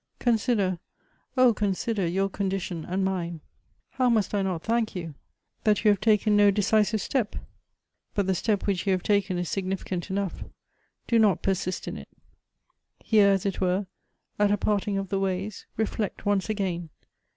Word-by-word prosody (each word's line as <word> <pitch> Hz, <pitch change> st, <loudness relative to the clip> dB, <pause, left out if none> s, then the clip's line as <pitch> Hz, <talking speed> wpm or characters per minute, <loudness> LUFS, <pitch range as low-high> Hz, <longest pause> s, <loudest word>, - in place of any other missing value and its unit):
" -, -, -45 dB
Consider, 210 Hz, -6 st, +1 dB, 0.6 s
oh! 255 Hz, -2 st, +6 dB
consider 205 Hz, -1 st, -1 dB
your 190 Hz, +3 st, +1 dB
condition 190 Hz, -4 st, -3 dB
and 190 Hz, +2 st, -1 dB
mine. 175 Hz, -3 st, -2 dB, 0.5 s
How 255 Hz, -1 st, +2 dB
must 220 Hz, -4 st, +1 dB
I 205 Hz, -, +1 dB
not 185 Hz, -4 st, -2 dB
thank 225 Hz, -2 st, 0 dB
you, 165 Hz, -4 st, -5 dB, 0.5 s
that 215 Hz, 0 st, +2 dB
you 210 Hz, -, +7 dB
have 200 Hz, -, 0 dB
taken 215 Hz, -1 st, +3 dB
no 205 Hz, 0 st, +6 dB
decisive 210 Hz, +2 st, +2 dB
step! 235 Hz, 0 st, -1 dB, 0.8 s
But 200 Hz, -, +1 dB
the 190 Hz, -, +1 dB
step 205 Hz, +2 st, 0 dB
which 200 Hz, -1 st, -1 dB
you 195 Hz, -, +4 dB
have 185 Hz, -, -1 dB
taken 200 Hz, -3 st, +1 dB
is 175 Hz, -1 st, -2 dB
significant 190 Hz, -1 st, -3 dB
enough. 195 Hz, -1 st, -2 dB, 0.6 s
Do 230 Hz, -, +3 dB
not 210 Hz, -4 st, +3 dB
persist 185 Hz, -1 st, -1 dB
in -, -, -4 dB
it. -, -, -10 dB, 0.9 s
Here 210 Hz, -3 st, +4 dB
as 195 Hz, -1 st, +1 dB
it 195 Hz, -1 st, -2 dB
were, 185 Hz, +2 st, +1 dB, 0.5 s
at 205 Hz, 0 st, +4 dB
a 205 Hz, -, +2 dB
parting 205 Hz, 0 st, 0 dB
of 195 Hz, -1 st, -3 dB
the 195 Hz, -, 0 dB
ways, 195 Hz, +1 st, -3 dB
reflect 220 Hz, -1 st, -2 dB
once 205 Hz, 0 st, +1 dB
again. 185 Hz, -6 st, -2 dB
195 Hz, 170 wpm, -26 LUFS, 185-210 Hz, 0.9 s, you